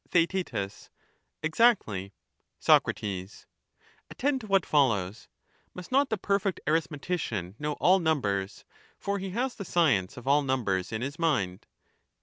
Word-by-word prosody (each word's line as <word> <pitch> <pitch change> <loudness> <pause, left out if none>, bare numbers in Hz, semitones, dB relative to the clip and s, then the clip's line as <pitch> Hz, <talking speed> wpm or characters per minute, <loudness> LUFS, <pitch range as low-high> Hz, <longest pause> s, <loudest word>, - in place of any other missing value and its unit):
Theaet 175 +2 +1 0.9
Exactly. 160 - +2 0.5
Soc, - - +5
Attend 105 - -5
to 215 - -9
what 195 -3 +3
follows: 115 -8 +1 0.5
must 180 +3 -9
not 275 +2 +3
the 220 - 0
perfect 200 0 0
arithme 155 -1 0
tician 110 - -3
know 150 0 -1
all 185 +5 +4
numbers, 100 - -1 0.3
for 200 0 -2
he 190 0 -4
has 245 +6 -1
the 200 - -7
science 135 - +1
of 125 - -10
all 145 +2 +5
numbers 115 -10 -1
in 110 +1 -3
his 140 +5 -5
mind 105 - 0
150 Hz, 135 wpm, -28 LUFS, -, 0.9 s, Soc